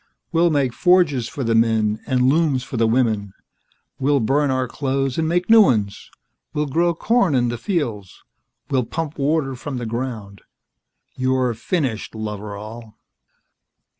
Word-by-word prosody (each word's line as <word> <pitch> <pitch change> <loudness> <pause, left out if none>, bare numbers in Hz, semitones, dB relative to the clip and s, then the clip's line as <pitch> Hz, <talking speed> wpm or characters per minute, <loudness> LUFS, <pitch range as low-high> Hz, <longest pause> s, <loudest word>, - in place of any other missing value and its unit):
We'll 170 +1 +3
make 140 -5 +1
forges 175 -9 +3
for 140 +1 -5
the 115 -1 +1
men 110 -2 +2
and 130 -2 +1
looms 140 -1 +2
for - - -8
the 115 -1 +2
women. 110 -5 0 0.7
We'll 140 +1 +2
burn 140 +5 +1
our 130 -1 0
clothes 135 +1 -2
and 160 - 0
make 175 +1 0
new 225 0 +8
ones. 105 - +1 0.5
We'll 150 0 0
grow 170 +4 +1
corn 195 - +2
in 120 -1 +2
the 120 - -3
fields. 120 - -3 0.5
We'll 130 -3 +1
pump 160 +3 -5
water 140 -1 0
from 130 +1 -6
the 120 - -4
ground. 110 -4 -5 0.7
You're 130 -1 +1
finished, 120 - -3
Loveral." 105 +1 -7
130 Hz, 145 wpm, -21 LUFS, 115-150 Hz, 0.7 s, new